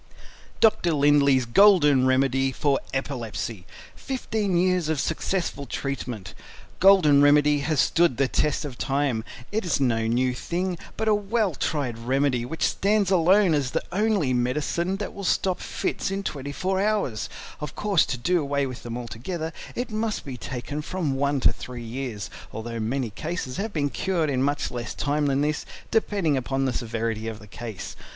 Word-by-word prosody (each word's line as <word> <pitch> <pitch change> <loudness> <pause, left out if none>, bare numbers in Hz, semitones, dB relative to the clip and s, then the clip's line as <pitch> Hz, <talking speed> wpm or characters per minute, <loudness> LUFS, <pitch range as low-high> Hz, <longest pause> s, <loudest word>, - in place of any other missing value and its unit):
Dr. 210 -6 +4
Lindley's 140 -3 +4
Golden 145 - +5
Remedy 135 0 +2
FOR 140 +1 +1
EPILEPSY 115 -7 -4 0.3
15 220 -8 -2
Years 180 -2 +2
of 160 -3 0
Successful 160 -2 -2
Treatment 125 -8 -4 0.5
Golden 175 -7 +6
Remedy 145 0 +5
has 150 0 0
stood 170 -7 +3
the 135 0 +3
test 150 +3 0
of 130 -4 -7
time; 135 -5 0 0.3
it 220 +2 -1
is 170 -6 0
no 115 -4 +1
new 125 +2 +1
thing, 175 +6 -3 0.2
but 220 - -1
a 215 - +5
well 205 -1 0
tried 135 -6 -2
remedy 130 0 +1
which 160 +6 -1
stands 200 -1 +1
alone 185 +1 +5
as 140 -4 +1
the - - -2
only 200 -8 +1
medicine 150 +9 0
that 205 0 -5
will 200 - -7
stop 185 0 +1
Fits - - -2
in 195 +1 -3
24 170 +6 -2
hours; 200 - 0 0.3
of 150 -1 -6
course 200 -5 +3
to 125 - -2
do 175 +8 +1
away 140 -1 0
with 130 -2 -6
them 120 0 -5
altogether 155 - -5 0.2
it 245 -1 -3
must 215 0 -2
be 135 -3 -5
taken 130 +4 -5
from 155 -3 -2
1 140 0 0
to - - +4
3 125 -1 -8
years, 115 -3 -5 0.2
although 115 +1 -5
many 120 +1 -1
cases 155 - -4
have 215 +2 -2
been 145 -5 -1
cured 170 -6 0
in 130 -1 0
much 145 +2 0
less 120 -3 -5
time 145 0 0
than 135 0 +1
this, 150 0 0 0.3
depending 195 -9 +1
upon 135 +1 -1
the 130 - 0
severity 115 -1 -2
of 110 -1 -4
the 105 - -13
case. 110 -1 -7
145 Hz, 170 wpm, -25 LUFS, 125-180 Hz, 0.5 s, Golden